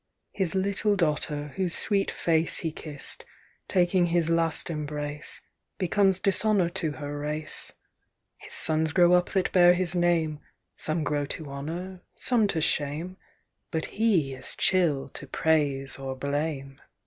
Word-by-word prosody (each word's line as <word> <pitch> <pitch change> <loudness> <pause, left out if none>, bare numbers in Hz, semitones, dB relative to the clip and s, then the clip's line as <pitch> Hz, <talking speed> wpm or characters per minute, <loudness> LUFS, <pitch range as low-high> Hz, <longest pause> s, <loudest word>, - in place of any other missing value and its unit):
"His 190 -2 0
little 200 +2 +1
daughter, 150 -4 -1
whose 185 -3 0
sweet 200 -2 +1
face 165 -1 +1
He 160 - -2
kiss'd, 150 -2 -1 0.4
taking 180 -1 +2
his 170 -1 +1
last 165 0 +1
embrace, 150 -1 -4 0.4
Becomes 190 +1 +2
dishonour 195 -1 +2
to 170 -4 -3
her 145 0 -6
race— 150 +1 -3 0.6
"His - - -9
sons 160 0 +3
grow 175 0 +5
up 180 0 +3
that 190 -2 +1
bear 175 -1 +6
his 180 -1 +1
name, 170 -4 +1 0.4
Some 155 +1 -1
grow 145 -1 -1
to 155 - -5
honour, 175 +7 -6
some 235 -4 +2
to 165 -5 -1
shame,— 155 +5 -2 0.5
But 160 -1 -2
he 195 -11 +1
is 130 - -4
chill 165 -8 +1
to 140 - -9
praise 140 -4 +1
or 135 -1 -4
blame. 140 0 -3
160 Hz, 140 wpm, -27 LUFS, 150-185 Hz, 0.6 s, bear